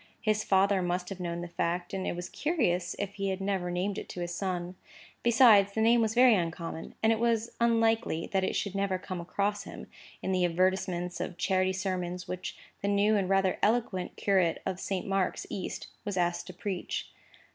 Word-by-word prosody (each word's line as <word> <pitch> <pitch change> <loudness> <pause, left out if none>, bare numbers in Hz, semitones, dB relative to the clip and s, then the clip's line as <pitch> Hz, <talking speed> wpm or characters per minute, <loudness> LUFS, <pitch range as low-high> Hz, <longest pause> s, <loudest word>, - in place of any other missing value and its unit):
His 215 -1 +1
father 195 0 +3
must 180 0 -1
have 195 -2 -6
known 170 -1 -3
the 175 - -5
fact, 175 +1 -2
and 190 -1 -2
it - - -1
was 175 0 -5
curious 225 - 0
if 200 0 -3
he 195 -1 -2
had 190 0 -2
never 195 -2 -1
named 185 +3 -1
it - - -9
to - - -6
his 175 0 -3
son. 180 -1 -3 0.5
Besides, 225 -4 +6
the 220 - 0
name 230 +1 +5
was 220 0 0
very 250 0 +7
uncommon; 165 -3 -3
and 220 - +5
it 220 - -2
was 230 -1 +1
unlikely 225 -6 +2
that 190 -1 +2
it - - -1
should 200 - -1
never 195 -1 0
come 185 -1 -5
across 200 +3 -1
him, - - -8 0.4
in - - -1
the 185 -1 +2
advertisements 180 0 0
of 180 - -4
charity 190 -1 +1
sermons 180 -2 -3
which 185 0 -5 0.2
the 200 - -1
new 205 +2 +3
and 195 -3 0
rather 195 -1 +2
eloquent 210 -5 0
curate 185 -5 +2
of 190 -1 -2
Saint 190 -2 -2
Mark's 195 -1 0
East 190 - -4 0.2
was 205 -3 -3
asked 175 -1 0
to 185 - -8
preach. 190 -1 -4
190 Hz, 200 wpm, -30 LUFS, 180-205 Hz, 0.5 s, very